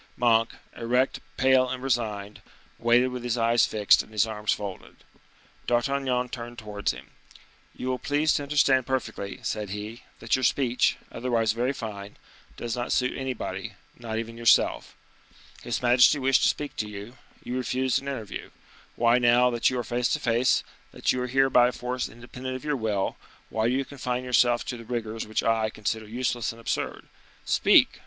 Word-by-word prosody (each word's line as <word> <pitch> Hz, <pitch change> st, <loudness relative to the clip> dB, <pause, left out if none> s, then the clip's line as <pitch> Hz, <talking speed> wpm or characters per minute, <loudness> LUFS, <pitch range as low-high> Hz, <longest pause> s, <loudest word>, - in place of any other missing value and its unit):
Monk, 115 Hz, -2 st, +3 dB, 0.2 s
erect, 125 Hz, +3 st, 0 dB, 0.2 s
pale, 130 Hz, -1 st, +4 dB
and 130 Hz, 0 st, -4 dB
resigned, 105 Hz, -5 st, -2 dB, 0.4 s
waited 120 Hz, +2 st, +4 dB
with 125 Hz, -1 st, -6 dB
his 120 Hz, -1 st, -1 dB
eyes 115 Hz, 0 st, +3 dB
fixed 105 Hz, -2 st, +4 dB
and -, -, -15 dB
his 105 Hz, 0 st, +2 dB
arms 105 Hz, -1 st, -2 dB
folded. 100 Hz, -3 st, -5 dB, 0.7 s
D'Artagnan 125 Hz, 0 st, 0 dB
turned 120 Hz, -1 st, -7 dB
towards 105 Hz, -2 st, -2 dB
him. -, -, -12 dB, 0.6 s
"You 130 Hz, -, -4 dB
will 130 Hz, -1 st, -1 dB
please 150 Hz, +2 st, +1 dB
to -, -, 0 dB
understand 140 Hz, -3 st, +2 dB
perfectly," 130 Hz, -6 st, -3 dB
said 105 Hz, -2 st, -3 dB
he, 105 Hz, +4 st, -6 dB, 0.2 s
"that 115 Hz, -, 0 dB
your 130 Hz, -, -2 dB
speech, 125 Hz, -1 st, +2 dB
otherwise 115 Hz, -3 st, 0 dB
very 120 Hz, +4 st, 0 dB
fine, 105 Hz, -6 st, -7 dB, 0.4 s
does 120 Hz, -1 st, -3 dB
not 120 Hz, -1 st, -3 dB
suit 125 Hz, 0 st, +1 dB
anybody, 130 Hz, -2 st, -4 dB, 0.2 s
not 115 Hz, -2 st, -5 dB
even 115 Hz, 0 st, -5 dB
yourself. 115 Hz, -, +3 dB, 0.7 s
His 120 Hz, +1 st, -3 dB
majesty 125 Hz, +4 st, +6 dB
wished 135 Hz, -1 st, +3 dB
to -, -, +5 dB
speak 145 Hz, -1 st, -3 dB
to 105 Hz, -, -2 dB
you, 105 Hz, +5 st, -9 dB, 0.3 s
you 125 Hz, -, -4 dB
refused 130 Hz, 0 st, 0 dB
an 140 Hz, -, -10 dB
interview; 125 Hz, -7 st, -5 dB, 0.5 s
why, 120 Hz, +1 st, +4 dB
now 120 Hz, +1 st, +4 dB
that 120 Hz, -1 st, +2 dB
you 130 Hz, -, -3 dB
are 120 Hz, -, -1 dB
face 120 Hz, +2 st, 0 dB
to -, -, 0 dB
face, 120 Hz, +1 st, +2 dB, 0.3 s
that -, -, +1 dB
you 130 Hz, -, -2 dB
are 125 Hz, -, -2 dB
here 135 Hz, +1 st, +2 dB
by 120 Hz, 0 st, +6 dB
a -, -, 0 dB
force 125 Hz, 0 st, -3 dB
independent 125 Hz, +2 st, -7 dB
of 130 Hz, -, -7 dB
your 150 Hz, -1 st, 0 dB
will, 105 Hz, -5 st, -1 dB, 0.3 s
why 110 Hz, 0 st, +1 dB
do 120 Hz, -, +1 dB
you 135 Hz, 0 st, 0 dB
confine 125 Hz, -3 st, -3 dB
yourself 120 Hz, -2 st, +3 dB
to 125 Hz, -, -4 dB
the 115 Hz, -, -10 dB
rigors 115 Hz, -2 st, -4 dB
which 110 Hz, -, -1 dB
I 110 Hz, -1 st, +2 dB
consider 110 Hz, +1 st, -3 dB
useless 120 Hz, +1 st, -1 dB
and 115 Hz, -, -13 dB
absurd? 115 Hz, -, -3 dB, 0.4 s
Speak! -, -, +4 dB
120 Hz, 180 wpm, -26 LUFS, 115-130 Hz, 0.7 s, majesty